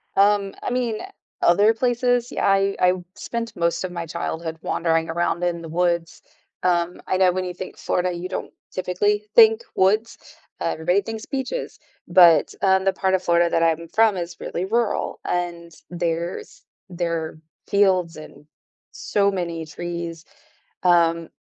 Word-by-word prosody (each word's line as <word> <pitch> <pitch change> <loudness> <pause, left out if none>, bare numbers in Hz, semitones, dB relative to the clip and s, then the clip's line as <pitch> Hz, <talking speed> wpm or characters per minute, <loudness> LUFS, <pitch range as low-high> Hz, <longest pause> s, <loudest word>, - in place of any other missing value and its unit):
Um, 200 0 +3
I - - -2
mean, 245 -3 -1 0.4
other 205 +6 +5
places? 245 +1 +1
Yeah, - - -1
I 195 0 +3
I 180 0 +5 0.2
spent 230 -1 -5
most 170 0 0
of 185 - -5
my 170 -1 -4
childhood 165 0 -4
wandering 165 -1 0
around 170 +1 -1
in 175 -1 -1
the 165 - -8
woods. 170 0 -1 0.4
Um, 175 -1 0
I - - +1
know 185 -1 +4
when 185 +1 -2
you 180 - -4
think 185 +1 -8
"Florida," 180 0 -1
you 175 +1 -5
don't 185 - -5 0.2
typically 195 +3 0
think 445 0 +7
"woods" 215 +5 +2 0.4
everybody 175 +5 +1
thinks 220 +2 -6
"beaches," 275 - -4 0.3
but, 175 -3 +6
um, 190 -1 +3
the 195 - +3
part 190 0 -1
of 190 -1 +1
Florida 170 0 +3
that 165 - +2
I'm 165 0 +1
from 220 +3 +3
is 170 -1 -5
really 175 - -3
rural, 230 +2 -1
and 175 -1 -3 0.2
there's 170 0 -4 0.3
there 170 -3 -3 0.3
fields 185 -4 +2
and 155 -1 -12 0.5
so 200 -1 0
many 170 -3 -3
trees, 170 +1 -6 0.6
um, 170 -2 +3
180 Hz, 150 wpm, -23 LUFS, 170-200 Hz, 0.6 s, think